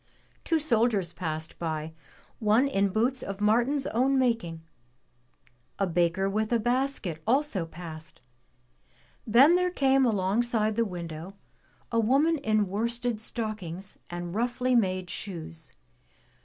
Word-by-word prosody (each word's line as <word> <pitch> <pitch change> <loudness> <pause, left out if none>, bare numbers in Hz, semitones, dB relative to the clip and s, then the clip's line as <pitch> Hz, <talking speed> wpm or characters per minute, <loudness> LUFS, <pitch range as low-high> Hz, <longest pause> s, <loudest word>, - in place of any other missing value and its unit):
Two 330 - +1
soldiers 230 - +1
passed 160 -2 -5
by, 160 -1 -3 0.5
one 220 +5 +3
in 200 -7 +1
boots 235 +6 +1
of 195 0 -6
Martin's 240 +7 +2
own 265 +4 +2
making. 225 -11 0 1.1
A 195 - +1
baker 175 +2 +1
with 215 +3 -1
a 235 - +4
basket 240 - -1
also 245 - +1
passed. 160 -2 -9 1.1
Then 260 +9 +7
there 360 0 +2
came 270 -5 +3
alongside 215 +1 +1
the 230 +1 +2
window 170 -1 -7 0.6
a 230 - +2
woman 280 +8 +3
in 215 -4 +1
worsted 235 +3 -1
stockings 205 -5 -5
and 175 0 -5
roughly 245 +3 0
made 185 -6 +1
shoes. 165 -4 -7
215 Hz, 120 wpm, -28 LUFS, 180-245 Hz, 1.1 s, Then